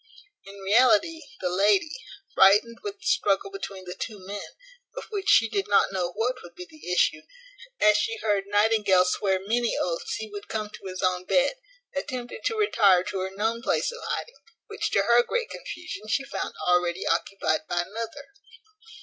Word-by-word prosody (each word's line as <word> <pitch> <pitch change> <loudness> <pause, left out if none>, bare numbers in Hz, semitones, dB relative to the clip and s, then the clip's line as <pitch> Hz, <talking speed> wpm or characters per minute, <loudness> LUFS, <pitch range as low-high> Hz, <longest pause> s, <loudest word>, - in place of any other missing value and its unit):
In 200 0 -11
reality 240 +10 +3 0.2
the 180 - 0
lady, 200 - +3 0.4
frightened 210 +4 +5
with 410 -1 -5
the 390 - -17
struggle 245 - +1
between 200 - -7
the 180 - -6
two 215 - -6
men, 205 +1 -7 0.4
of - - -4
which 405 -1 -2
she 225 - +6
did 205 -3 -2
not 200 - +3
know 180 -2 -2
what 245 +5 -1
would 175 0 -13
be 180 - -8
the 155 +2 -9
issue, 180 - +2 0.6
as 210 0 +5
she 455 +1 -1
heard 205 - 0
Nightingale 205 -3 +3
swear 190 +1 +1
many 230 +5 0
oaths 170 -2 -2
he 220 - -5
would 205 -1 -9
come 215 -1 -4
to 195 - -10
his 185 0 -6
own 185 0 0
bed, 275 +6 +3 0.4
attempted 255 -4 -5
to 465 -3 0
retire 200 - +4
to 190 - -4
her 190 0 -2
known 220 +4 -2
place 260 - 0
of 480 - -9
hiding, - - -4 0.3
which 420 -2 -3
to 200 - +2
her 235 +3 +5
great 485 - -2
confusion 360 - -7
she 270 +5 0
found 275 - -5
already 180 0 +2
occupied 160 -6 0
by 175 0 +1
another. 225 +8 -7
210 Hz, 180 wpm, -26 LUFS, 190-245 Hz, 0.6 s, she